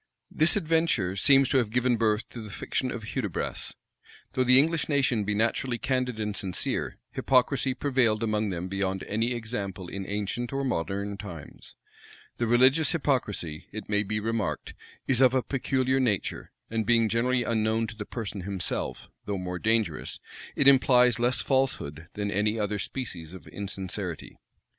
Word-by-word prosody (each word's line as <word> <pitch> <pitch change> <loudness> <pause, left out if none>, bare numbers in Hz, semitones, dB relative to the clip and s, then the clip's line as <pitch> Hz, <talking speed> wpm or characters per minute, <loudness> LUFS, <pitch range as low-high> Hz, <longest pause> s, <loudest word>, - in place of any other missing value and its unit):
This 155 +2 +4
adventure 160 - +1
seems 135 +6 +5
to 135 - +4
have 115 -4 0
given 125 +2 +2
birth 110 -1 +1
to 120 - -8
the 110 - -8
fiction 130 +5 -2
of 120 -3 -5
Hudibras. 105 -10 -3 0.6
Though 130 - +2
the 125 +1 +6
English 160 +3 +3
nation 130 -7 +2
be 105 0 0
naturally 120 +3 0
candid 125 -2 -1
and 105 -1 -2
sincere, 90 -1 -2
hypocrisy 130 0 +2
prevailed 125 -6 +1
among 105 -1 0
them 90 -1 -3
beyond 95 0 -2
any 115 +4 -1
example 100 -6 -5
in 95 -1 -5
ancient 105 +4 -3
or 135 0 -1
modern 100 - -2
times. 85 -8 -9 0.6
The 120 - 0
religious 130 +6 +4
hypocrisy, 105 - -1
it 110 -1 -7
may 105 -1 +2
be 105 +1 -2
remarked, 115 0 -2 0.3
is 130 -1 +2
of 130 0 +5
a 130 - +2
peculiar 130 -1 0
nature; 110 -8 -1 0.2
and 115 -1 0
being 115 0 +3
generally 120 +3 +1
unknown 110 0 +1
to 110 0 -8
the 105 - -5
person 105 -2 -5
himself, 95 0 -3 0.2
though 100 -1 -2
more 90 -1 -4
dangerous, 110 -7 0 0.4
it 140 - +3
implies 125 -3 +6
less 120 -1 +2
falsehood 85 - -1
than 100 -1 -2
any 105 +3 +1
other 105 0 -1
species 90 -10 -5
of 95 - -11
insincerity. 95 -3 -5
110 Hz, 160 wpm, -27 LUFS, 100-130 Hz, 0.6 s, the